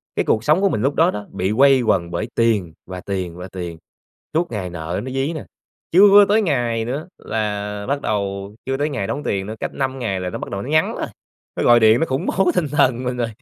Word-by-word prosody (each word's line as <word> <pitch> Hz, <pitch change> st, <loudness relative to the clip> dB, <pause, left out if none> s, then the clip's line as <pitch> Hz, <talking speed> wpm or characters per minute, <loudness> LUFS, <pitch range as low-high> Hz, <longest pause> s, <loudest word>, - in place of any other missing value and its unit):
cái -, -, 0 dB
cuộc 110 Hz, -, +1 dB
sống 155 Hz, +8 st, +3 dB
của 200 Hz, -, +3 dB
mình 110 Hz, -, -1 dB
lúc 135 Hz, +4 st, +1 dB
đó 170 Hz, +3 st, +4 dB
đó, 105 Hz, -, -6 dB
bị 95 Hz, 0 st, -1 dB
quây 135 Hz, -1 st, +6 dB
quần 85 Hz, -7 st, +1 dB
bởi 85 Hz, +6 st, -2 dB
tiền 105 Hz, -8 st, +1 dB
và 90 Hz, -1 st, -7 dB
tiền 95 Hz, -4 st, -4 dB
và 90 Hz, +1 st, -7 dB
tiền, 85 Hz, -3 st, -6 dB, 0.6 s
suốt 170 Hz, +2 st, 0 dB
ngày 95 Hz, -5 st, -3 dB
nợ 85 Hz, +2 st, -4 dB
nó 130 Hz, -, -5 dB
dí 135 Hz, +4 st, -1 dB
nè. 155 Hz, -, -6 dB, 0.5 s
Chưa 200 Hz, +3 st, +8 dB
tới 215 Hz, +2 st, +3 dB
ngày 120 Hz, -, 0 dB
nữa 135 Hz, +8 st, -4 dB
là 105 Hz, -1 st, -3 dB
bắt 140 Hz, +1 st, 0 dB
đầu 100 Hz, -3 st, -3 dB
chưa 135 Hz, 0 st, -1 dB
tới 145 Hz, +2 st, 0 dB
ngày 125 Hz, -9 st, -2 dB
đóng 145 Hz, -, -3 dB
tiền 95 Hz, -1 st, -1 dB
nữa, 110 Hz, -, -5 dB
cách -, -, -4 dB
5 135 Hz, -1 st, -2 dB
ngày 100 Hz, -7 st, -2 dB
là 90 Hz, 0 st, -3 dB
nó -, -, -5 dB
bắt -, -, -7 dB
đầu 100 Hz, -, -4 dB
nó 125 Hz, -, -7 dB
nhắn 155 Hz, +1 st, +2 dB
rồi, -, -, -3 dB, 0.5 s
nó -, -, -1 dB
gọi 120 Hz, 0 st, +6 dB
điện 110 Hz, +1 st, +5 dB
nó 165 Hz, -, +2 dB
khủng 135 Hz, +6 st, -2 dB
bố 190 Hz, -1 st, +2 dB
tinh 175 Hz, -5 st, +1 dB
thần 130 Hz, -3 st, +2 dB
mình 125 Hz, 0 st, -2 dB
rồi, 120 Hz, -2 st, -1 dB
115 Hz, 250 wpm, -20 LUFS, 100-140 Hz, 0.6 s, Chưa